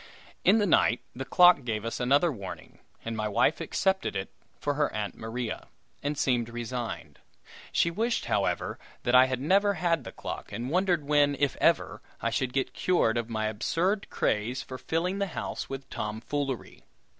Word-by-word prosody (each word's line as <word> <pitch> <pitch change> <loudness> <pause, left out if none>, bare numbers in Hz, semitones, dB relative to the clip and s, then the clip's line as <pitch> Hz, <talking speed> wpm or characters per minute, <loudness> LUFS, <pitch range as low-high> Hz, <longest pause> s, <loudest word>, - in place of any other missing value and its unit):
In 200 +4 +6
the 210 - +3
night 120 - +3
the 135 +2 -4
clock 175 0 +6
gave 110 -2 -2
us 115 - -3
another 140 +7 +3
warning, 100 -8 -8 0.3
and 115 0 -3
my 110 -1 -1
wife 105 - +2
accepted 190 - 0
it 95 0 -3 0.3
for 145 - 0
her 145 0 +1
Aunt 105 -1 -2
Maria, 115 +1 -5 0.3
and 145 +1 -2
seemed 120 -4 +1
resigned. 120 0 -5 0.5
She 170 - +2
wished, 230 +7 0
however, - - 0 0.2
that 120 - 0
I 130 +1 +8
had 130 -1 -2
never 200 +8 +3
had 165 -1 +1
the - - -7
clock, - - -7
and 120 +6 -4
wondered 180 -2 +2
when, 145 -1 +3
if 140 -3 +1
ever, - - +2 0.2
I - - -1
should 130 -1 0
get 135 0 -1
cured 170 -11 +2
of 120 -1 -2
my 110 -1 -1
absurd 170 - 0
craze 115 +4 0
for 130 -1 -8
filling 180 +4 -1
the 200 - 0
house - - -4
with 135 0 -6
tomfoolery. 120 +5 -4
135 Hz, 175 wpm, -28 LUFS, 115-170 Hz, 0.5 s, I